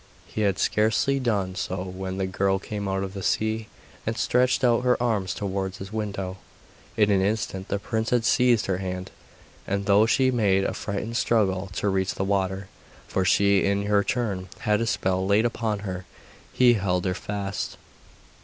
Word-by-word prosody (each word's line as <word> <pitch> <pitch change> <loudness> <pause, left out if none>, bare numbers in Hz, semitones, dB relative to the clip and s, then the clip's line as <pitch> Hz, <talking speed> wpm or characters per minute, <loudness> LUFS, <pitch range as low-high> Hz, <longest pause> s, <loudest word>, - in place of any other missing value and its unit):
He 110 - -4
had 100 -2 +2
scarcely 110 +8 +2
done 100 -7 0
so 90 0 -3
when 95 0 -5
the 95 - 0
girl 95 +1 +1
came 100 +1 -5
out 95 0 -1
of 95 -1 -5
the 100 - -5
sea, 110 +2 0 0.4
and - - -2
stretched 125 +2 +2
out 120 -1 +3
her 125 -1 +3
arms 110 -6 0
towards 95 -2 -3
his 95 +2 -8
window. 100 -3 -3 0.6
In 105 -2 +4
an 95 -1 +3
instant 95 -2 -1
the - - -1
prince 110 +2 -2
had 120 -2 +2
seized 125 -2 +4
her 95 -1 -1
hand, 90 -1 -5 0.6
and 100 0 -1
though 105 +2 +5
she 130 +3 +3
made 100 -5 +2
a - - -1
frightened 110 +3 -3
struggle 100 -4 +1
to 100 - -1
reach 95 -1 0
the - - -1
water 95 0 -1 0.4
for 95 - 0
she 100 +1 +4
in 100 0 +1
her 105 0 +3
turn 100 -7 -2
had 105 -2 +2
had - - -2
a 115 - 0
spell 95 -4 0
laid 100 +4 +3
upon 110 -3 -1
her 95 -1 -5 0.5
he 125 -1 +5
held 95 -4 0
her 90 - +1
fast. 100 +1 -4
100 Hz, 185 wpm, -25 LUFS, 95-110 Hz, 0.6 s, though